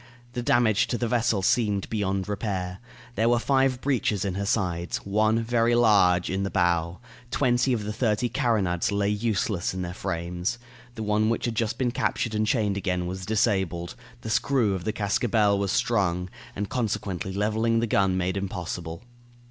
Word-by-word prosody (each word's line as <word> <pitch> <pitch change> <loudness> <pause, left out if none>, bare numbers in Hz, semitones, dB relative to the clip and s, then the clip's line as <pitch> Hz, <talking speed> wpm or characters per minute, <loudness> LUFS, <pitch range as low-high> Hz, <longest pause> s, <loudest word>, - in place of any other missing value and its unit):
The 120 - -2
damage 120 -3 +3
to 120 - -1
the 120 - -1
vessel 115 -4 +1
seemed 105 -2 +1
beyond 100 -3 -1
repair. 95 -3 -3 0.3
There 115 0 +2
were 120 - +4
five 130 +1 +1
breaches 110 -8 0
in 95 - -1
her 100 +1 -3
sides, 90 -5 -1
one, 110 +3 +2
very 120 0 +2
large, 100 -7 +4
in 95 +1 -1
the 100 - -1
bow; 85 -2 +1 0.3
twenty 125 0 +2
of 115 -4 0
the 105 +1 -4
thirty 110 +1 +1
carronades 100 -9 0
lay 100 0 +1
useless 105 -3 -1
in 90 - -3
their 90 0 -5
frames. 90 +2 -3 0.4
The 110 - -4
one 105 +1 +2
which 115 - -1
had 120 - -1
just 115 0 -1
been 125 -2 0
captured 120 -1 -1
and 110 0 0
chained 105 -4 +1
again 90 -3 -1
was 95 +1 -5
disabled; 95 -6 0 0.3
the 110 - -5
screw 120 -3 +2
of 90 -2 -4
the - - +1
cascabel 105 0 +1
was 100 -2 0
sprung, 90 -5 0 0.2
and 100 +1 -3
consequently 100 -6 -2
leveling 110 +3 +1
the 115 - +1
gun 95 -4 +2
made 95 +1 -1
impossible. 85 -3 -5
105 Hz, 175 wpm, -26 LUFS, 95-115 Hz, 0.4 s, were